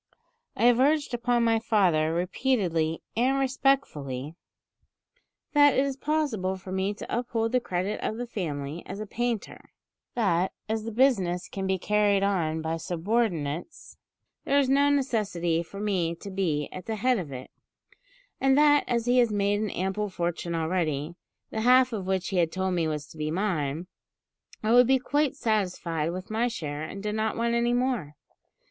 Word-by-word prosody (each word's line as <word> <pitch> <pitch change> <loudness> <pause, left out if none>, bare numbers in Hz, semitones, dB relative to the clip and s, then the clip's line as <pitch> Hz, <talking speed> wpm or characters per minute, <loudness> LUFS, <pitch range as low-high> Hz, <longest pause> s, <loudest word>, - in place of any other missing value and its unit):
I - - -2
have 245 0 +5
urged 290 +1 +2
upon 240 0 +1
my 225 -1 +3
father 180 -9 +2
repeatedly 175 -3 0
and 255 +4 +2
respectfully, 255 - 0 1.2
that 290 -2 +6
it 270 - +3
is 275 -1 -2
possible 265 -11 -1
for 185 0 -10
me 190 +2 -1
to 225 - -3
uphold 225 -2 -1
the 250 - +3
credit 190 -1 -2
of 220 - -2
the 245 - -3
family 155 - -4
as 200 - -6
a 215 - -4
painter; 235 0 -4 0.5
that, 190 -6 +1
as 220 0 -2
the 230 - -4
business 195 -8 +2
can 190 -1 -4
be 190 0 +1
carried 205 0 +2
on 160 -5 0
by 160 +1 -1
subordinates, 175 - -2 0.5
there 280 - +2
is 275 -2 +3
no 280 +1 +4
necessity 205 -12 0
for 185 +4 -9
me 185 -5 0
to 195 +4 -9
be 165 -7 -1
at 185 -1 -9
the 220 - -1
head 250 +2 +2
of 155 -6 -6
it; 130 -1 -8 0.9
and 270 0 +3
that, 290 -1 +5
as 235 -1 0
he 245 +1 +4
has 240 -3 +3
made 205 0 +1
an 215 - -1
ample 190 +3 -2
fortune 175 -1 -3
already, 160 -2 -1 0.4
the 220 - -2
half 255 +1 +5
of 195 -4 -4
which 190 -1 -1
he 195 - -2
had 165 -2 +2
told 190 0 -1
me 170 -2 +1
was 150 -2 -3
to 155 - -15
be 155 0 -1
mine, 165 -4 -1 0.8
I 215 - +1
would 245 0 +7
be 265 +1 +5
quite 290 +2 0
satisfied 180 -7 -1
with 185 +3 -7
my 225 +3 +1
share, 150 -10 -4
and 195 +6 -6
did 210 0 -2
not 220 0 -1
want 235 0 0
any 235 0 +2
more. 245 - -1
200 Hz, 175 wpm, -27 LUFS, 170-240 Hz, 1.2 s, would